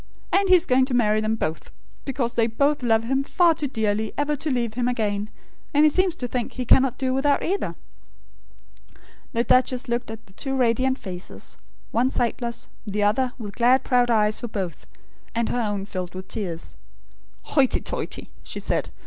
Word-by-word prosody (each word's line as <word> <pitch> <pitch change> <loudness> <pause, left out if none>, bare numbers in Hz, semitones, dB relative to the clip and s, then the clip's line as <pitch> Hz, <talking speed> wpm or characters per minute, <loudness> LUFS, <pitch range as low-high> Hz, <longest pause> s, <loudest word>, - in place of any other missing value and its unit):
And 390 0 +3
he 370 - +9
is 350 -1 +3
going 255 -2 +4
to 260 -2 -1
marry 215 -3 +3
them 215 +1 0
both; 160 -7 -3 0.4
because 255 -3 -1
they 230 -1 +2
both 280 +6 +1
love 225 -2 +3
him 270 +4 0
far 345 +3 +4
too 300 -2 -2
dearly 220 -3 -1
ever 290 +1 +1
to 305 +2 -3
leave 240 -4 0
him 245 +1 0
again; 210 -4 -1 0.5
and 295 +1 +6
he 305 - +5
seems 370 +1 +2
to 250 - -4
think 245 -1 -3
he 250 - -4
cannot 260 0 +4
do 260 -1 0
without 280 +2 +2
either." 390 +3 -1 1.6
The 235 - +2
duchess 255 +2 +3
looked 240 0 -2
at 225 0 -8
the 190 - -20
two 270 +6 -2
radiant 255 +2 +2
faces; 180 -5 -6 0.3
one 245 +3 +2
sightless; 235 -2 -1 0.2
the 205 0 0
other, 245 +5 +2
with 210 -5 -7
glad 250 +2 +4
proud 245 -1 +3
eyes 215 -2 +2
for 240 - -4
both; 190 -8 -5 0.5
and 230 0 0
her 245 - 0
own 205 -3 -2
filled 185 -3 -5
with 185 0 -7
tears. 175 -7 -5 0.7
"Hoity 270 -4 +2
toity!" - - -4
she - - -5
said. - - -1
240 Hz, 185 wpm, -24 LUFS, 215-265 Hz, 1.6 s, he